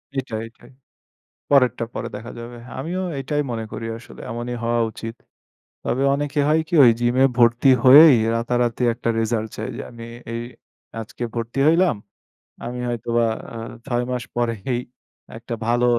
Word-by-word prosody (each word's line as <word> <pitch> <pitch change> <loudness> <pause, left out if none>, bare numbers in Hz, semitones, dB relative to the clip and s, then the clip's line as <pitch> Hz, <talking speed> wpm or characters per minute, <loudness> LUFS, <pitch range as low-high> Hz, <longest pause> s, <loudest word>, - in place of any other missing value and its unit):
এটাই, 125 -5 -3
এটাই। 115 +3 -18 0.8
পরেরটা 125 -5 +4
পরে - - -4
দেখা 115 +3 -8
যাবে। 120 +1 -8 0.2
আমিও 175 +7 -3 0.2
এটাই 145 +2 -1
মনে 115 -2 -3
করি 115 +1 -5
আসলে, 115 - -14
এমনই 120 +1 -4
হওয়া 120 0 +1
উচিত। 115 +1 -7 0.7
তবে 130 +3 0
অনেকে 145 +1 -1
হয় 155 +1 +4
কি 175 - -3
ওই 120 - +8
জিমে 120 +2 +3
ভর্তি 120 +3 +5
হয়েই 140 +2 +9 0.2
রাতারাতি 120 0 0
একটা 115 0 -4
রেজাল্ট 110 -1 -1
চায়, - - -4
যে - - -6
আমি 115 -1 -10 0.3
এই 115 - -3 0.6
আজকে 115 +2 -8
ভর্তি 115 +2 -4
হইলাম। 165 - +4 0.7
আমি 125 +1 -5
হয়তোবা 120 0 0 0.3
আ - - -5 0.3
ছয় 120 -2 0
মাস 125 -2 -2
পরেই 120 0 -1 0.6
একটা 120 +1 -7
ভালো 120 +1 +2
120 Hz, 150 wpm, -22 LUFS, 115-130 Hz, 0.8 s, হয়েই